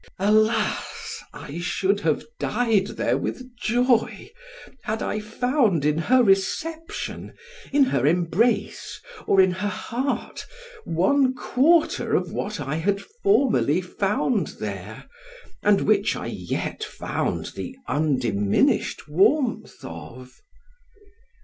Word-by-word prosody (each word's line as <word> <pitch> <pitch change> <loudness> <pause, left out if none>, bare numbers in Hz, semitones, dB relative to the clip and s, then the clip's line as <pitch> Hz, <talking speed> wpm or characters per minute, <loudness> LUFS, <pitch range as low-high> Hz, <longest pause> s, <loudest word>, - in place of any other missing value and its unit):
Alas! 215 +3 +1
I 150 +4 -8
should 190 +3 0
have 160 -6 0
died 220 -4 +1
there - - +1
with 255 -1 -5
joy, 240 - +1 0.5
had 220 +1 -3
I 210 - -2
found 220 - +1
in 150 +1 +2
her 250 +9 +4
reception, 315 +12 -1 0.4
in 285 0 +5
her 140 - +1
embrace, 175 +8 0 0.3
or 195 - +4
in 185 -1 +6
her 185 +3 -2
heart, 240 +7 -3 0.4
one 255 - +2
quarter 300 +6 +2
of - - 0
what 205 -2 -4
I 145 +2 -3
had 200 +4 0
formerly 275 - +1
found 205 +5 0
there, - - -6 0.5
and 205 -1 +4
which 205 0 +2
I - - -5
yet - - -4
found - - -3
the 260 - -6
undiminished 125 -8 +1
warmth 220 - +1
of. 115 +11 -10
205 Hz, 110 wpm, -24 LUFS, 165-250 Hz, 0.5 s, in